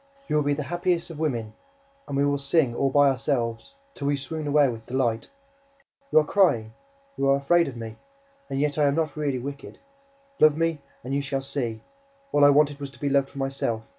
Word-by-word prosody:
You - - -1
will 150 - +4
be 145 0 +1
the 150 - -3
happiest 175 +1 -1
of 155 - -9
women. 120 -9 -2 0.5
And 140 - -3
we 140 - +3
will 145 0 +1
sing, 140 -2 +2
all 135 +3 +1
by 145 +1 +5
ourselves, 130 - -1 0.2
till 140 - -4
we 145 - +2
swoon 155 +2 -5
away 145 -1 +4
with 115 -3 -6
delight. 120 -3 -1 0.8
You - - +4
are 155 - +6
crying! 120 - +2 0.4
You 135 - +1
are 135 - +5
afraid 170 +5 +3
of 130 -3 -7
me! 110 -1 -7 0.5
And 135 - -2
yet 150 +1 0
I 150 - +4
am 140 0 +2
not 155 -2 -1
really 145 -3 -1
wicked. 140 +3 -7 0.6
Love 155 -1 +5
me 165 -2 0 0.2
and 130 - -4
you 140 - +1
shall 140 -1 -3
see! 125 -5 -3 0.5
All 145 - +3
I 145 - +8
wanted 145 0 +3
was 140 -1 -5
to 135 - -18
be 145 - -1
loved 140 0 +2
for - - -14
myself. 135 -5 -2
140 Hz, 215 wpm, -25 LUFS, 135-150 Hz, 0.8 s, I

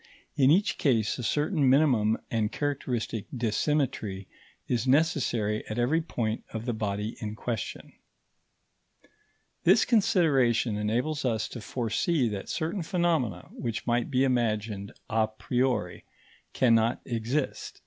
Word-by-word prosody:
in 135 -1 +4
each 190 +7 +3
case 115 -8 +1
a - - -4
certain 150 - +1
minimum 125 -6 +4
and 110 -2 0
characteristic 125 -7 -2
dissymmetry 115 -4 -1 0.4
is 125 0 0
necessary 130 -8 +1
at 110 - -5
every 135 +8 +2
point 115 -8 -3
of 110 0 -5
the 120 - -1
body 105 0 -3
in 105 -1 -5
question. 110 -3 -5 1.7
This 195 +6 +5
consideration 135 - +3
enables 120 +9 -1
us 115 -4 0
to 120 - -7
foresee 125 +5 0
that 100 -2 -5
certain 170 +4 -2
phenomena 160 - 0
which 115 -3 -4
might 120 0 0
be 130 -1 +2
imagined 110 -5 0 0.2
a 110 -1 +1
priori 125 +4 -1 0.5
cannot 115 -1 +3
exist. 120 +4 -3
120 Hz, 120 wpm, -28 LUFS, 110-145 Hz, 1.7 s, This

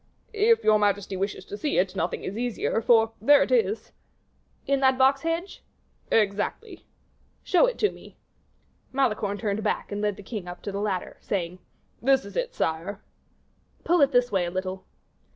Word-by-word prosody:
"If 450 +2 +3
your 215 0 +5
majesty 205 -1 0
wishes 190 0 -3
to - - -7
see 295 +6 -1
it, 185 +1 +1
nothing - - -2
is 195 - -5
easier, 235 -1 -1
for 225 -1 +4
there 285 +5 +6
it - - -5
is." 455 -3 +1 0.7
"In 275 -1 +1
that 265 -1 +3
box 270 +1 +4
hedge?" 330 +4 -3 0.5
"Exactly." 215 - -1 0.6
"Show 380 +6 +4
it - - -3
to 420 - +2
me." - - -15 0.7
Malicorne 215 -6 0
turned 210 0 -2
back, 210 - -2
and 205 0 -3
led 210 -1 0
the 205 - -12
king 200 -3 -6
up 175 0 -9
to 200 - -4
the 200 +1 -3
ladder, 195 -4 -3
saying, 180 -2 -3 0.4
"This 265 -1 +3
is 200 - -11
it, - - -2
sire." 170 +6 -2 0.8
"Pull 345 -1 +3
it 280 0 +5
this 245 -2 +2
way 190 -3 +1
a - - -2
little." 185 +1 -5
215 Hz, 175 wpm, -26 LUFS, 195-280 Hz, 0.8 s, there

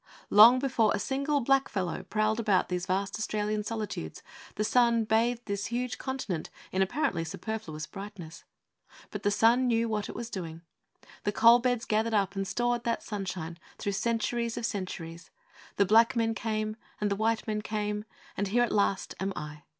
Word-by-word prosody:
Long 225 +5 +9
before 250 -5 +2
a - - -2
single 280 +4 0
black 270 +2 +2
fellow 185 -3 -2
prowled 215 +3 0
about 205 -5 +2
these 180 +1 -2
vast 195 +3 -1
Australian 210 -1 -1
solitudes, 210 - -5 0.3
the 210 - 0
sun 235 0 +3
bathed 230 +2 +1
this 200 -1 -2
huge 245 +1 -3
continent 240 - -3 0.2
in 190 - 0
apparently 190 - 0
superfluous 170 -3 -5
brightness. 195 -5 -9 0.7
But - - -5
the 205 - +2
sun 230 +5 +4
knew 230 -1 +2
what 215 -2 -2
it - - -7
was 235 0 -6
doing. 165 -3 -6 0.6
The 205 - +1
coalbeds 235 +2 +4
gathered 220 +1 +1
up 195 -1 +1
and 195 0 -2
stored 240 +4 0
that 230 -1 -1
sunshine 185 -5 -5 0.2
through 200 - -2
centuries 235 +2 -1
of 235 - -2
centuries. 170 -5 -5 0.5
The 200 - +3
black 225 +5 +5
men 225 -1 +1
came; 215 -1 -2 0.2
and 210 -1 0
the - - +2
white 220 +2 0
men 215 -1 -2
came; 210 -1 -3 0.3
and 200 - -1
here 240 +5 +3
at 240 - -1
last 200 -2 +1
am 195 +1 -1
I! 150 0 -7
215 Hz, 175 wpm, -29 LUFS, 195-230 Hz, 0.7 s, Long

